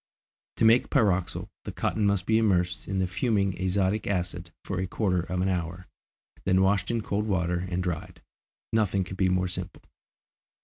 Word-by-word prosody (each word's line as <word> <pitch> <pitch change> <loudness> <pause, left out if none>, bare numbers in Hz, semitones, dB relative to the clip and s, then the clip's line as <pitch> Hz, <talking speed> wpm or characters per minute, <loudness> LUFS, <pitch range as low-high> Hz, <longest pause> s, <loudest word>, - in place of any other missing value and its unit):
To - - +3
make 115 +2 +5
pyroxyle, 95 -9 +1 0.2
the - - -5
cotton 105 -2 0
must 100 -3 +1
be 110 +1 +3
immersed 90 -5 +1
in 95 - -2
the 95 - +2
fuming 100 0 0
azotic 95 +2 +1
acid 90 -2 -2
for 95 - -3
a 95 - -1
quarter 90 -2 0
of 90 +1 -3
an 95 - +1
hour, 90 -1 -2 0.6
then 95 0 +3
washed 95 0 +2
in 115 -1 0
cold 105 +1 -2
water 90 -2 0
and 90 0 -1
dried. 85 -4 -4 0.5
Nothing 100 -3 +2
could 90 +1 -8
be 95 -1 +3
more 90 0 +1
simple. 90 0 -6
95 Hz, 175 wpm, -27 LUFS, 90-100 Hz, 0.6 s, make